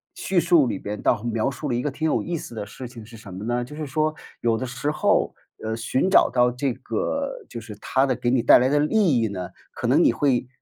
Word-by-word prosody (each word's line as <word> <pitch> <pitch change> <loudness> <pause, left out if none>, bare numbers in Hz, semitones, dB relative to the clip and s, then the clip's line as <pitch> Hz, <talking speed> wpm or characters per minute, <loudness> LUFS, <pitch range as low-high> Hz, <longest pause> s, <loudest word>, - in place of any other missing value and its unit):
叙 185 -2 0
述 170 -4 +4
里 95 - -3
边 105 0 -5
倒 - - +2
描 115 +1 0
述 145 +2 -5
了 120 - 0
一 120 - 0
个 145 - -2
挺 155 +3 -4
有 - - +1
意 170 -1 -3
思 120 - -9
的 105 - -4
事 125 +5 -9
情 115 -3 -11
是 115 0 -13
什 100 -4 -11
么 95 +3 -7
呢？ 120 +1 0
就 150 - -11
是 155 0 -4
说 155 +2 0 0.3
有 115 -1 +2
的 130 - -3
时 125 +4 -3
候， 155 - +1 0.3
呃， 110 0 -2
寻 130 +10 0
找 - - +5
到 125 -1 +3
这 130 0 -1
个 280 - -3
就 - - -6
是 105 -1 -9
它 135 +1 +2
的 130 -2 0
给 120 - -1
你 130 - +3
带 - - +7
来 125 - +3
的 145 +1 +3
利 155 - +3
益 115 - +1
呢， 90 -3 -5 0.2
可 - - -3
能 - - +4
你 - - +5
会 130 -4 +1
125 Hz, 285 characters per minute, -24 LUFS, 115-150 Hz, 0.3 s, 带